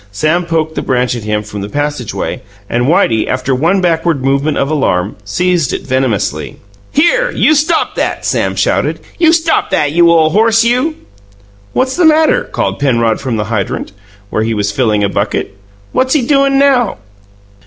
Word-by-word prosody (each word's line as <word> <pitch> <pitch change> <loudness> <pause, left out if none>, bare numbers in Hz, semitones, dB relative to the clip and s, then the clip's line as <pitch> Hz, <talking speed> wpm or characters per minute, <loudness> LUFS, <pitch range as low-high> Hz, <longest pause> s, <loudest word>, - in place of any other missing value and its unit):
Sam 155 - 0
poked 160 -1 -1
the - - -3
branch 125 -1 0
at 115 -3 -7
him 105 0 -1
from 105 -1 -7
the 100 - -5
passageway, 145 -4 -3 0.3
and 120 +2 0
Whitey, 115 -8 +2
after 130 +1 -1
one 165 +9 +1
backward 165 -5 0
movement 140 +3 +1
of 135 - 0
alarm, 100 -10 0
seized 170 - 0
it - - -4
venomously. 115 - -1 0.3
"Here! - - +2
You 310 - +2
stop 310 +2 +1
that!" - - -2
Sam - - 0
shouted. - - 0 0.2
"You 330 -2 +5
stop 330 0 +1
that, 145 -1 +1
you 170 +2 +4
ole 160 -2 +4
horse, 225 +3 +3
you!" 250 +7 +1 0.8
"What's 260 0 0
the 355 - +2
matter?" 320 +10 +3
called - - -3
Penrod 115 -5 +1
from 125 -4 -2
the 105 - -1
hydrant, 100 -2 -3 0.4
where 110 - 0
he 110 0 -1
was 100 -1 -1
filling 105 -2 +1
a - - +2
bucket. 100 -1 -2 0.4
"What's 260 +3 +1
he 285 - +2
doin' 275 0 +2
now?" 265 -6 +2
155 Hz, 175 wpm, -13 LUFS, -, 0.8 s, You